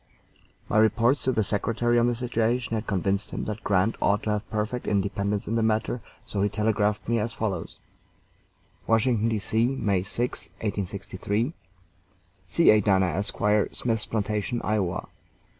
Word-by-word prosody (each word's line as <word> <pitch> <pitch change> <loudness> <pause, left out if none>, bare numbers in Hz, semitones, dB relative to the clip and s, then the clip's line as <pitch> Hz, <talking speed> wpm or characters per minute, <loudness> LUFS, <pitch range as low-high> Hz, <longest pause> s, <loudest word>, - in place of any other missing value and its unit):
My 110 - +2
reports 115 +5 +3
to 130 - +3
the 110 -3 +1
Secretary 115 +4 +1
on 120 - +3
the 120 - +1
situation 120 0 0
had 110 0 -2
convinced 100 +1 0
him - - -4
that 105 0 -5
Grant 100 +2 +2
ought 100 +1 +2
to 110 - 0
have 105 -1 -2
perfect 110 +3 -2
independence 100 0 0
in 110 - -2
the 115 - +2
matter, 110 +2 0 0.2
so 100 - -2
he 100 - +2
telegraphed 105 -1 0
me 115 0 +2
as 115 +2 -2
follows: 95 -7 -3 1.1
WASHINGTON, 115 0 +2
D.C., 115 +4 +1
May 100 -7 +1
6, 120 +6 -3 0.2
1863. 100 - -2 1.0
C. 170 - +5
A. 105 0 +5
DANA, 95 -2 +3
Esq., 95 +5 -2 0.4
Smith's 115 -3 -1
Plantation, 105 +2 -1
Ia. 95 -5 0
110 Hz, 150 wpm, -26 LUFS, 100-115 Hz, 1.1 s, C